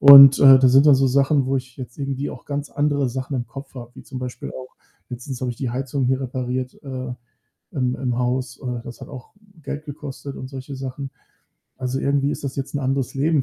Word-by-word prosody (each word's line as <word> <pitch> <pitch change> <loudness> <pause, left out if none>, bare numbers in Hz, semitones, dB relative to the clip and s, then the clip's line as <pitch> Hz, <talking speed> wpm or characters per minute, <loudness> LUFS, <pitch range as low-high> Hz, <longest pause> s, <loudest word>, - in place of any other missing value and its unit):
Und, 140 -1 +11
äh, 135 -1 +9
das 130 -1 +5
sind 135 +3 +7
dann 145 - +8
so 135 +1 +3
Sachen, 140 +1 +3
wo 135 +1 +1
ich 130 -1 -6
jetzt 125 -2 -8
irgendwie 140 0 -3
auch 125 - -10
ganz 145 0 -4
andere 145 -2 +1
Sachen 130 +2 -4
im 120 -1 -3
Kopf 135 0 -10
habe, 120 -1 -8
wie - - -11
zum 130 - -7
Beispiel 125 -1 -6
auch 130 0 -10 0.4
letztens 125 +1 -6
habe 125 - 0
ich - - -14
die 130 -3 -3
Heizung 130 +1 -2
hier 130 +1 +1
repariert, 130 0 -3
äh, 130 -2 -5 0.6
im 125 -5 0
im 125 -3 -2
Haus. 125 0 -1
Äh, 125 -3 -4
das 120 - -10
hat - - -8
auch 130 -3 -10 0.3
Geld 145 +2 -5
gekostet 140 -1 -7
und 130 - -7
solche 135 +1 -7
Sachen. 135 +1 -5 0.7
Also, 130 +1 -2
irgendwie 140 0 +1
ist 145 - -5
das 135 - -4
jetzt 135 +1 -4
'n - - +1
anderes 135 -1 -1
Leben 145 +1 +2
135 Hz, 225 wpm, -22 LUFS, 125-140 Hz, 0.7 s, Und